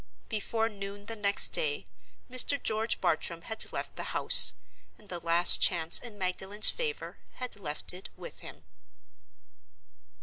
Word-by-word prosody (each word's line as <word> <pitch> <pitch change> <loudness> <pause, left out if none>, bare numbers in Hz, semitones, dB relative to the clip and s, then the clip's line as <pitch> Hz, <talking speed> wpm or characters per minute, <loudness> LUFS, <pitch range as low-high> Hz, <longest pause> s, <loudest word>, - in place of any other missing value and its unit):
Before 225 +1 -3
noon 200 -1 -10
the 225 - -8
next 200 -2 +3
day 145 -9 -2 0.4
Mr. 255 +3 +1
George 220 0 -3
Bartram - - -3
had - - -4
left - - -7
the - - -5
house, - - +6 0.4
and 210 - -23
the 175 - -4
last 170 +1 +5
chance 170 -3 +4
in 230 -4 -12
Magdalen's 190 +2 +2
favor 460 -2 -7
had 250 -1 -7
left 155 -7 -6
it 185 +1 -10
with - - -11
him. 75 +4 -13
200 Hz, 140 wpm, -28 LUFS, 175-225 Hz, 0.4 s, house